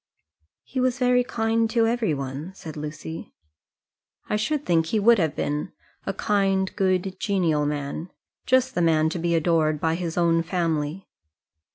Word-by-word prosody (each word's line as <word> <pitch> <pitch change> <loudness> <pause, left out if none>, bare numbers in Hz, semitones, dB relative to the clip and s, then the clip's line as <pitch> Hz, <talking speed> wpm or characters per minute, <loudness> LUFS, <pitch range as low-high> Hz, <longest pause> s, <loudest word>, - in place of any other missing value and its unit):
"He 260 - -4
was 255 -1 +1
very 250 0 +3
kind 225 -1 0
to 230 -1 +2
every 225 -8 +1
one," 140 +7 -6
said 160 -5 -9
Lucy. 155 +2 -7 0.9
"I - - 0
should 290 +7 -1
think 165 -2 +2
he 220 - +1
would 230 +1 +5
have 160 -4 0
been 150 +1 -2 0.3
a - - 0
kind, 195 -2 +1
good, 185 -1 0
genial 165 -7 +1
man 145 +3 -4 0.4
just 260 0 +3
the 175 - 0
man 160 -2 +3
to 170 - -4
be 170 0 +1
adored 160 -2 +2
by 160 +1 +1
his 170 -1 -3
own 165 -1 +3
family." 165 -1 -2
175 Hz, 160 wpm, -25 LUFS, 160-220 Hz, 0.9 s, would